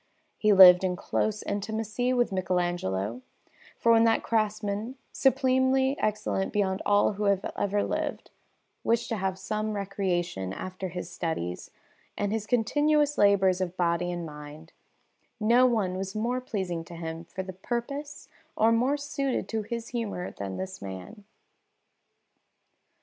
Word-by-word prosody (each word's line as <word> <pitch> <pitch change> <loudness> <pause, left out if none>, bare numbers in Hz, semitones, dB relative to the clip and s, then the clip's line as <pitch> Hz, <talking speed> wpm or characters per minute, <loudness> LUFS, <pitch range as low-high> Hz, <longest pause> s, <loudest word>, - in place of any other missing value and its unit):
He 215 - +4
lived 185 -2 +9
in 185 -1 0
close 215 +3 -1
intimacy 220 +4 -2
with 245 -3 +2
Michelagnolo, 175 - -1 0.6
for 230 - +3
when 225 0 +6
that 225 0 +3
craftsman, 215 +1 -1 0.2
supremely 265 0 +2
excellent 210 -2 -1
beyond 195 -2 0
all 205 +1 +4
who 205 +1 -3
have 200 -1 +1
ever 205 0 0
lived, - - -3 0.5
wished 235 0 +1
to 225 - -1
have 190 -1 -2
some 215 +3 -3
recreation 180 - -2
after 185 - -5
his 180 0 -6
studies 160 - -4 0.5
and 205 0 -1
his 215 -1 -2
continuous 290 +5 +2
labours 190 -2 +4
of 185 0 -3
body 175 0 +1
and 175 -1 -4
mind, 150 +1 -10 0.7
no 235 +4 +5
one 210 -7 0
was 190 +2 -4
more 240 +4 -1
pleasing 185 -8 -3
to 170 - -10
him 165 0 -6
for 185 +3 -6
the 190 0 -7
purpose 245 +9 -5 0.3
or 225 +1 +4
more 250 +5 +2
suited 280 -2 -2
to 220 -1 -1
his 230 +2 -5
humour 220 -7 -3
than 95 -1 -6
this 190 0 -6
man. 100 - -8
205 Hz, 140 wpm, -28 LUFS, 180-230 Hz, 0.7 s, lived